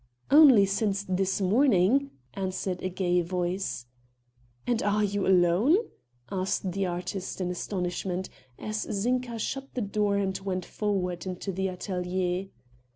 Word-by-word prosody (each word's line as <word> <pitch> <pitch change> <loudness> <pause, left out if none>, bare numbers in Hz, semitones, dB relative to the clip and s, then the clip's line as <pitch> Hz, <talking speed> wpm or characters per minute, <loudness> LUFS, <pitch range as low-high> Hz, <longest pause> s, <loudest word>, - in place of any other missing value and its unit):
"Only 275 -9 +8
since 200 0 -1
this 190 +1 0
morning," 230 +4 +3 0.2
answered 185 -1 -3
a 185 - -2
gay 180 -1 +1
voice. 180 -5 -2 0.8
"And 240 -2 +1
are 210 +1 +1
you 205 -1 0
alone?" 190 - +4 0.5
asked 190 0 -1
the 195 +1 -1
artist 180 +2 -4
in 180 -1 -1
astonishment, 180 0 -3 0.3
as 215 0 -3
Zinka 240 +3 -1
shut 270 +4 -4
the 250 - -1
door 205 -1 0
and 190 -1 0
went 185 -2 -3
forward 185 -4 -2
into 185 +2 -4
the 190 +1 -1
atelier. 180 0 -2
190 Hz, 130 wpm, -28 LUFS, 180-210 Hz, 0.8 s, Only